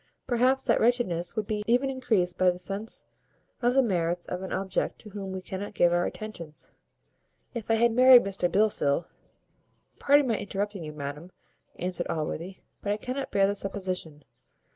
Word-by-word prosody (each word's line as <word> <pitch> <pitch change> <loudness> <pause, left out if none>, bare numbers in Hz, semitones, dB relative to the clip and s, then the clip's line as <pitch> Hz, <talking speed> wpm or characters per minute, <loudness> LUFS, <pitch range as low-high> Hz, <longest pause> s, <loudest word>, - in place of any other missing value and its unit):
Perhaps 255 +2 +2
that 235 - +3
wretchedness 220 -8 +1
would 215 -2 -1
be 210 0 -2
even 250 +3 +2
increased 215 -9 +1
by 185 - +2
a 180 0 +3
sense 195 +4 -1 0.6
of 245 +1 +2
the 270 - +5
merits 175 -5 0
of 180 - -5
an 190 - -6
object 190 -1 -1
to 210 - -12
whom 195 -1 -6
we 190 -1 -5
cannot 190 +2 -6
give 175 0 +4
our 175 0 +2
affections. 170 -8 -7 0.8
If 235 -3 -6
I 225 - +4
had 235 +1 +3
married 250 +1 +8
Mr 195 -2 -1
Blifil 190 -7 +2 0.5
" - - -41
"Pardon 285 0 +5
my 225 -3 0
interrupting 200 -1 -3
you, 155 - -6
madam," 150 +4 -7 0.5
answered 180 -1 -2
Allworthy, 165 +4 -4 0.2
"but 205 - -2
I 205 - 0
cannot 255 +5 -4
bear 195 -1 +3
the 200 - +1
supposition. 185 -6 -4
195 Hz, 175 wpm, -27 LUFS, 180-230 Hz, 0.8 s, married